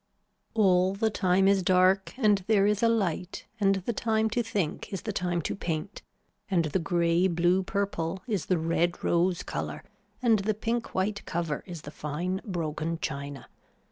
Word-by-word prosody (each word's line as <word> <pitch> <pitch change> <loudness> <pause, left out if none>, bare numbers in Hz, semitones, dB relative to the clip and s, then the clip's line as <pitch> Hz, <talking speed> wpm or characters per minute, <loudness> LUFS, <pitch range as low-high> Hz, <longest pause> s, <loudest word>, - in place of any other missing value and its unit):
All 190 -3 +4
the 220 +2 +1
time 190 -1 +3
is 195 -1 +4
dark 185 +1 +3
and 210 -6 +3
there 205 -3 +4
is 210 0 +2
a 230 - +4
light 190 -5 -1
and 195 -1 +3
the 195 +5 -2
time 220 -1 +1
to 240 - +1
think 205 -8 -3
is 195 - -4
the 215 - -3
time 175 -3 -1
to - - -2
paint 170 +2 -4 0.5
and 175 -4 +2
the 155 +5 0
grey 170 +1 +2
blue 175 +1 +2
purple 190 -2 -2
is 205 -8 -2
the 185 - +2
red 170 +2 0
rose 175 +1 +1
color - - -4 0.4
and 230 -4 +3
the 210 +2 0
pink 230 +2 -2
white 200 +2 -1
cover 165 -3 -2
is 170 -4 -8
the 145 - -8
fine 170 +6 -3
broken 165 -3 -3
china. 140 -2 -5
185 Hz, 175 wpm, -28 LUFS, 170-205 Hz, 0.5 s, All